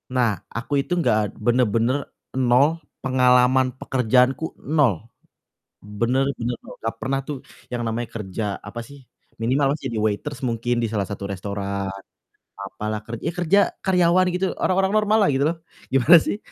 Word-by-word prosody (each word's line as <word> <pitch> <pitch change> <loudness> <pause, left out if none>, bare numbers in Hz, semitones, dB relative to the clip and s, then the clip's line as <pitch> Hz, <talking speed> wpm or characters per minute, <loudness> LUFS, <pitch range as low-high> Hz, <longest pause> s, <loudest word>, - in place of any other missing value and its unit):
Nah, 120 -3 +3 0.2
aku 140 +5 -1
itu 175 - -2
enggak 105 -9 +1
bener-bener 120 +2 +2 0.3
nol, 130 +6 +3 0.2
pengalaman 130 0 +4
pekerjaanku 130 +4 +2
nol. 130 - +1 0.8
Bener 120 +6 0
bener 120 +1 -2
nol, - - -11
gak 115 0 -3
pernah 135 +1 0
tuh 145 -3 -4 0.3
yang 120 -1 -3
namanya 115 +1 -2
kerja, 105 0 -4
apa 105 +4 -9
sih, 140 +1 -14 0.4
minimal 135 +4 +2
jadi 120 -5 -4
waiters 105 +3 -2
mungkin 120 0 -1
di - - +1
salah 105 -2 0
satu 100 -1 -5
restoran 100 0 -3 0.7
apalah, 105 +2 -5
ker 115 - -4
ya - - -1
kerja 180 +3 +3 0.2
karyawan 180 0 +3
gitu, 190 +1 0
orang-orang 190 +1 +2
normal 215 0 +3
lah - - +3
gitu 135 +1 +1
loh. 165 +1 -1 0.3
Gimana 135 +6 +7
sih - - -2
125 Hz, 150 wpm, -23 LUFS, 110-140 Hz, 0.8 s, Gimana